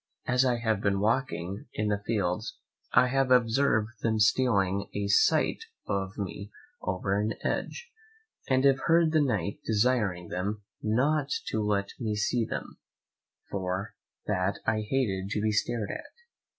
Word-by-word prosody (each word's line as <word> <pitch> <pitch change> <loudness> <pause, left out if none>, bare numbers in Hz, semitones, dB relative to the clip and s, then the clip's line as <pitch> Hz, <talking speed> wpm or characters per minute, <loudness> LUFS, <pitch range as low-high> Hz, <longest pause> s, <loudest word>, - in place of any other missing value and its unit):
As 125 +1 +3
I 125 -2 +2
have 110 -3 0
been 100 -1 +1
walking 105 -4 -1
in 105 0 0
his 100 - 0
fields 105 -1 -1 0.3
I 120 - +6
have 135 0 +1
observed 120 -2 +2
them 110 -1 +1
stealing 100 -3 +2
a 100 0 -1
sight 100 - +3 0.2
of 95 0 -2
me 100 0 -5 0.3
over 95 +1 -1
an 105 +2 0
hedge, 480 0 -3 0.6
and 130 0 +3
have 135 -1 +5
heard 165 -1 +4
the 155 -1 +4
Knight 100 - -1
desiring 105 -6 +1
them 100 +3 -3 0.2
not 140 +7 +1 0.2
to 110 - -1
let 100 -1 0
me 110 -4 -1
see 115 +3 +1
them, - - -6 0.7
for 95 +2 -3 0.3
that 95 -1 0
I 110 -1 +1
hated 100 -8 0
to - - 0
be 110 +1 +1
stared 110 0 -1
at. - - -7
105 Hz, 150 wpm, -28 LUFS, 100-125 Hz, 0.7 s, I